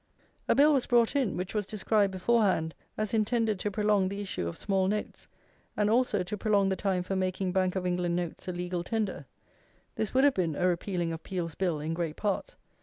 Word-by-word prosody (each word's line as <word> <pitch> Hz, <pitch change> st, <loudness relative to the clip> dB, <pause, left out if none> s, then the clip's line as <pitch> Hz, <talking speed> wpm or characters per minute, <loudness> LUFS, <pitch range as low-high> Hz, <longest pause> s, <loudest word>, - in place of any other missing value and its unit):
A -, -, +4 dB
Bill 295 Hz, +2 st, +6 dB
was 270 Hz, -3 st, +1 dB
brought 240 Hz, +1 st, +3 dB
in, 260 Hz, -8 st, +1 dB
which 180 Hz, +1 st, -4 dB
was 210 Hz, -3 st, -1 dB
described 210 Hz, -1 st, +1 dB
beforehand 190 Hz, -5 st, +2 dB, 0.2 s
as 215 Hz, +1 st, -2 dB
intended 220 Hz, -1 st, +1 dB
to 210 Hz, -, -1 dB
prolong 205 Hz, -2 st, +2 dB
the 200 Hz, +1 st, -5 dB
issue 190 Hz, -, -3 dB
of 85 Hz, -, -5 dB
small 195 Hz, -2 st, +1 dB
notes, 210 Hz, +2 st, -3 dB, 0.5 s
and 210 Hz, 0 st, +2 dB
also 230 Hz, -5 st, +2 dB
to 180 Hz, +4 st, -4 dB
prolong 200 Hz, -2 st, +2 dB
the 190 Hz, -, +1 dB
time 185 Hz, -1 st, 0 dB
for 195 Hz, +2 st, -3 dB
making 185 Hz, 0 st, -1 dB
Bank 185 Hz, 0 st, +1 dB
of 185 Hz, -1 st, -2 dB
England 175 Hz, -1 st, 0 dB
notes 175 Hz, +1 st, -4 dB
a -, -, -1 dB
legal 175 Hz, 0 st, -3 dB
tender. 215 Hz, 0 st, -2 dB, 0.7 s
This 220 Hz, -, -2 dB
would 265 Hz, -, +5 dB
have 285 Hz, -1 st, +5 dB
been 170 Hz, -, 0 dB
a 180 Hz, -, 0 dB
repealing 175 Hz, -1 st, -1 dB
of 165 Hz, -, -6 dB
Peel's 175 Hz, -4 st, -4 dB
Bill 175 Hz, -5 st, -1 dB
in 155 Hz, +2 st, -3 dB
great 165 Hz, -2 st, -2 dB
part. 210 Hz, -, -2 dB
195 Hz, 210 wpm, -29 LUFS, 180-215 Hz, 0.7 s, Bill